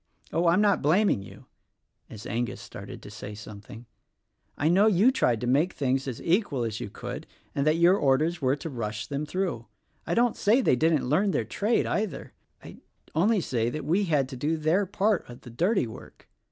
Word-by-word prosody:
Oh, 170 +1 +2
I'm 175 +4 +4
not 205 -2 +3
blaming 170 - +3
you" 95 - -13 0.6
(as 110 -1 -10
Angus 120 +2 -3
started - - -10
to 105 - -10
say 105 0 -8
something); 105 +2 -11 0.7
"I 145 - +1
know 190 +6 +5
you 215 +5 +5
tried 125 - +1
to - - -2
make 145 +9 +2
things 135 0 -1
as 125 -4 -4
equal 170 - +1
as 110 -2 -3
you - - -5
could, - - -7 0.3
and 140 +2 0
that 155 - +4
your 175 +3 +5
orders 155 +4 +1
were 130 0 +2
to 155 +3 -7
rush 110 -4 -4
them 145 +1 -4
through. 185 +5 -3 0.4
I - - 0
don't 240 0 +2
say 215 +5 +3
they 240 - +3
didn't 155 0 +1
learn 185 +10 +2
their - - 0
trade, 215 +3 0
either. 210 -4 -3 0.3
I - - -11 0.4
only 200 +6 +2
say 115 -6 -1
we 185 +7 +1
had 150 -6 +1
to 135 - -7
do 150 +6 -1
their 165 +6 +1
part 205 - 0
of 120 - -11
the 120 - -11
dirty 180 - +1
work. 110 - -12
155 Hz, 195 wpm, -27 LUFS, 125-195 Hz, 0.7 s, know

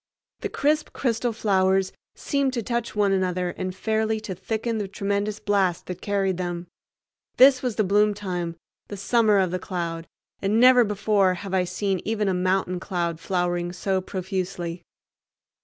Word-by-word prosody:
The - - -3
crisp 300 +2 0
crystal 240 -1 0
flowers 190 -3 +1 0.2
seemed 280 -3 0
to 235 -3 -2
touch 235 0 -2
one 205 -1 +2
another 185 -2 0
and 185 0 -5
fairly 220 +2 0
to 210 -3 -5
thicken 220 +5 -3
the 205 - -2
tremendous 200 +2 -2
blast 195 -4 +1
that 180 - -7
carried 195 -3 0
them. 175 -1 -3 0.7
This 260 0 +7
was 250 -4 -2
the 215 - +2
bloom 205 +2 +3
time, 180 -4 -4 0.3
the 205 - -7
summer 215 +1 +3
of 185 -3 +2
the 185 - -2
cloud, 170 -3 -4 0.3
and 205 +3 +2
never 250 0 +7
before 200 -3 +2
have 190 +2 -7
I 185 -1 +2
seen 190 +1 -1
even 215 -1 -1
a 190 - +2
mountain 185 0 0
cloud 170 -3 -2
flowering 175 -1 -1
so 190 +1 -1
profusely. 185 -2 -4
195 Hz, 160 wpm, -25 LUFS, 180-215 Hz, 0.7 s, This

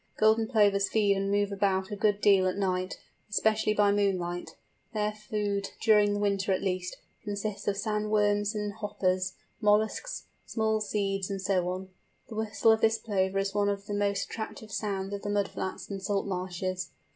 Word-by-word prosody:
Golden 220 +1 +4
Plovers 205 -4 +3
feed 205 -2 +3
and 195 0 -1
move 205 0 +1
about 195 -1 0
a - - -2
good 205 0 +1
deal 195 -2 +5
at 185 - -1
night, 185 -1 -1 0.3
especially 215 +1 +2
by 205 -1 +4
moonlight. 185 -4 -1 0.4
Their 210 0 +1
food, 210 -2 -2
during 210 -2 +4
winter 200 -1 +1
at 185 - +1
least, 185 -1 -2 0.3
consists 205 -1 -4
of 200 -1 +1
sand 210 0 -1
worms 205 0 +2
and 210 -1 -2
hoppers, 190 -3 -1 0.3
molluscs, 215 - +1 0.2
small 220 -1 0
seeds, 195 -2 -1
and 195 -1 -3
so 185 -2 +1
on. 185 +1 -4 0.4
The 225 - -7
whistle 220 +1 +2
of 220 0 +3
this 225 0 +4
Plover 195 -3 0
is 195 0 0
one 205 0 +2
of 200 0 -3
the 205 - -4
most 200 -1 0
attractive 220 -1 -7
sounds 200 -2 -2
of 200 - -4
the 205 - -4
mud 205 -1 +1
flats 190 - -5
and 195 -1 -4
salt 200 +1 0
marshes. 185 -1 -3
205 Hz, 180 wpm, -29 LUFS, 195-210 Hz, 0.4 s, deal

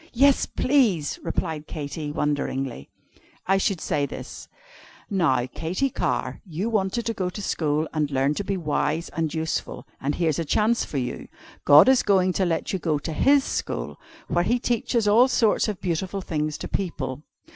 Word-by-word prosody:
"Yes, 275 +3 +4
please!" 225 - +1
replied 160 -2 -3
Katy 150 0 -5
wonderingly. 135 - -2 0.6
"I 195 +1 +3
should 195 -2 0
say 145 -2 -1
this: - - -8 0.6
'Now, 160 -11 +2
Katy 175 - -2
Carr, - - -2
you 190 +5 -3
wanted 210 +2 0
to 230 - -1
go 185 -4 -2
to 180 - -8
school 155 -5 0
and 150 -2 0
learn 135 +1 +1
to 205 - -3
be 195 0 -2
wise 155 0 -1
and 160 -2 -2
useful, 160 0 -3 0.2
and 145 +2 -1
here's 160 -3 0
a - - 0
chance 215 +9 +2
for 145 - -5
you. 125 -2 -3 0.4
God 145 - +8
is 265 -1 +5
going 185 -3 +3
to 190 - +1
let 170 +2 -1
you 190 - -1
go 160 -3 0
to 155 +3 -5
His 280 - +4
school - - -4 0.3
where 175 - +1
He 240 +7 +2
teaches 235 -2 0
all 230 +5 +6
sorts 240 -4 +2
of 210 -3 -3
beautiful 185 +3 -2
things 155 -3 -2
to - - -6
people. 145 -8 -3
170 Hz, 175 wpm, -24 LUFS, 150-205 Hz, 0.6 s, God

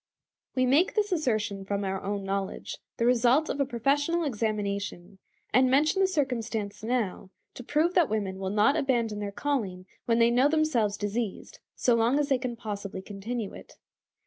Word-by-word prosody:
We 255 -1 +3
make 290 +9 +3
this 415 -2 +1
assertion 215 - 0
from 200 +1 -2
our 190 0 -2
own 200 0 -3
knowledge, 195 0 -4 0.2
the 230 - +1
result 250 +5 +3
of - - -2
a 280 - +1
professional 290 +7 +1
examination, 205 - -3 0.3
and 255 +2 +5
mention 305 +8 +3
the 385 - +5
circumstance 235 - -2
now 220 -5 -2 0.2
to 250 - -9
prove 310 +7 +1
that 345 -7 +3
women 200 -3 -2
will 190 -1 -2
not 210 +8 +3
abandon 235 -8 0
their 205 -1 -3
calling 200 -8 -2 0.2
when 230 -1 +3
they 235 0 +5
know 255 +4 +4
themselves 260 -10 +1
diseased, 215 - -4 0.2
so 245 - +2
long 230 +4 +3
as 295 0 0
they 265 -2 +3
can 250 -2 -3
possibly 200 -4 -6
continue 210 +2 -5
it. - - -12
230 Hz, 170 wpm, -28 LUFS, 205-275 Hz, 0.3 s, and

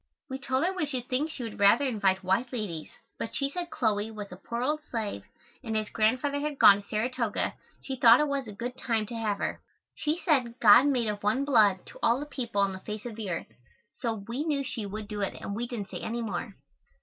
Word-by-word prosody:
We 265 - -3
told 265 +2 0
her 375 - 0
we 360 -6 -1
should 255 -3 -4
think 275 +5 0
she 285 -5 -6
would 225 -3 -7
rather 205 +8 +6
invite 200 -6 +1
white 195 +7 +1
ladies, 200 -10 -4 0.3
but 225 - -4
she 275 0 0
said 350 +2 -4
Chloe 215 -6 0
was 210 -3 -8
a - - -7
poor 235 +6 -4
old 300 +3 0
slave 220 - -4 0.4
and 220 -2 -1
as 215 -1 -3
Grandfather 255 +6 +1
had 295 -1 -3
gone 200 -4 +8
to 200 - -22
Saratoga 230 0 -1 0.3
she 265 -1 -4
thought 235 0 +8
it 300 - +2
was 280 -3 -2
a - - -6
good 240 +5 -5
time 225 -3 0
to 235 - -7
have 215 -3 -1
her. - - -3 0.3
She 305 +2 -1
said 255 -9 +1
God 235 +5 +8
made 250 -5 +1
of 205 -1 -3
one 240 +7 +1
blood 210 -9 +4 0.2
all 235 +3 +3
the 290 - -4
people 240 -8 -2
on 195 -1 +2
the 190 - -7
face 210 +3 -7
of 235 -3 -5
the 215 -3 -5
earth, 165 -9 -4 0.4
so 230 -3 -2
we 245 +5 -2
knew 295 -3 0
she 225 -5 -4
would 210 +1 -6
do 210 -1 -4
it 195 - -1
and 200 - -5
we 240 +3 -2
didn't 225 -5 -5
say - - -6
any 235 +1 -3
more. 200 0 -4
230 Hz, 235 wpm, -28 LUFS, 210-265 Hz, 0.4 s, gone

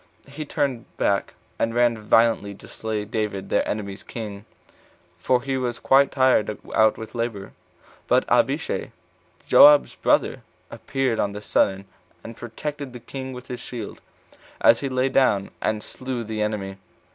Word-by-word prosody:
He 145 +3 -7
turned 135 -5 -2
back, 100 -1 0 0.2
and 115 0 0
ran 120 -1 +3
violently 105 -1 +2
to - - -14
slay 110 -2 -4
[David] 105 -2 -3
their - - +2
enemy's 100 -2 -4
king, 105 -3 -7 0.7
for 125 +6 +1
he 135 -1 -1
was 120 -2 -2
quite 140 +1 +4
tired 130 -6 +2 0.2
out 110 0 +4
with 110 - -8
labor; 115 -5 -4 0.6
but - - +3
Abishai, - - 0 0.5
Joab's 145 0 +7
brother, - - +1 0.3
appeared 130 -4 -2
on 100 - 0
the 105 - -6
sudden, 95 -1 +1 0.4
and 115 - -9
protected 140 +4 -6
the 125 - -8
king 130 +2 -7
with 125 -1 -9
his 125 -2 -6
shield, 120 -3 -7 0.6
as - - +5
he 140 - -3
lay 130 0 +1
down, 130 -7 +2
and 110 -1 -1
slew 130 -2 -5
the 110 -1 -4
enemy. 100 -2 -3
115 Hz, 150 wpm, -23 LUFS, 105-130 Hz, 0.7 s, Joab's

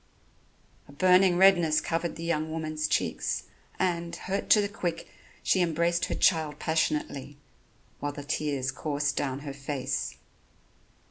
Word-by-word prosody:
A - - -14
burning 180 +3 +4
redness 175 -5 +5
covered 165 0 -2
the 165 - -7
young 160 -2 -1
woman's 155 -1 -2
cheeks, - - -1 0.3
and, 170 -2 -1
hurt 195 +1 -3
to 215 - +7
the 205 - +1
quick, 180 -5 -4 0.4
she 185 - +3
embraced 170 0 +1
her - - -3
child 155 -4 +2
passionately, 150 -3 -1 0.6
while 145 - -2
the 145 0 -8
tears 145 -2 -1
coursed 145 0 -1
down 135 -1 -2
her 140 -1 -6
face. 140 -1 -3
160 Hz, 135 wpm, -28 LUFS, 145-175 Hz, 0.6 s, to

